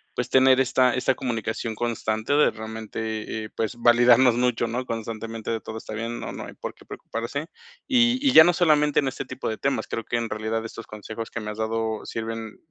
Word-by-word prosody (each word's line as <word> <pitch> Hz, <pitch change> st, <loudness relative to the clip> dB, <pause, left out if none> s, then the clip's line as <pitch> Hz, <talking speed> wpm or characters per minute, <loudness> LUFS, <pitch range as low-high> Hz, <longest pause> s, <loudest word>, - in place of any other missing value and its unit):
pues, 125 Hz, -, -2 dB
tener 130 Hz, 0 st, +6 dB
esta 130 Hz, -1 st, +3 dB
esta 130 Hz, +1 st, +2 dB
comunicación 115 Hz, -2 st, -3 dB
constante 110 Hz, +1 st, -1 dB
de 150 Hz, -, +5 dB
realmente, 110 Hz, 0 st, -7 dB, 0.5 s
eh, -, -, -9 dB
pues 110 Hz, +2 st, -2 dB
validarnos 120 Hz, +1 st, +5 dB
mucho, 125 Hz, -1 st, +1 dB
¿no? 125 Hz, +3 st, -2 dB
Constantemente 115 Hz, -1 st, -5 dB
de: 115 Hz, -1 st, -2 dB
"Todo 110 Hz, -, -7 dB
está 110 Hz, -, -8 dB
bien, 115 Hz, +1 st, -4 dB
no -, -, -5 dB
no -, -, -6 dB
hay -, -, -10 dB
por -, -, -6 dB
qué -, -, -19 dB
preocuparse". 120 Hz, +7 st, -5 dB, 0.4 s
Y 245 Hz, -2 st, +4 dB
y 265 Hz, -, +4 dB
ya 160 Hz, -, +11 dB
no 175 Hz, +2 st, +4 dB
solamente 150 Hz, -4 st, +3 dB
en 140 Hz, -, 0 dB
este 135 Hz, -, -6 dB
tipo -, -, -6 dB
de 110 Hz, -, -3 dB
temas, 140 Hz, -, -1 dB
creo 115 Hz, -, -4 dB
que 120 Hz, -, -1 dB
en 115 Hz, -1 st, -2 dB
realidad 110 Hz, +1 st, -2 dB
estos 115 Hz, 0 st, -8 dB
consejos 110 Hz, +2 st, -7 dB
que -, -, -4 dB
me 105 Hz, 0 st, -4 dB
has 105 Hz, -, -9 dB
dado 110 Hz, 0 st, -2 dB
sirven, 115 Hz, -1 st, -5 dB
115 Hz, 210 wpm, -25 LUFS, 110-130 Hz, 0.5 s, ya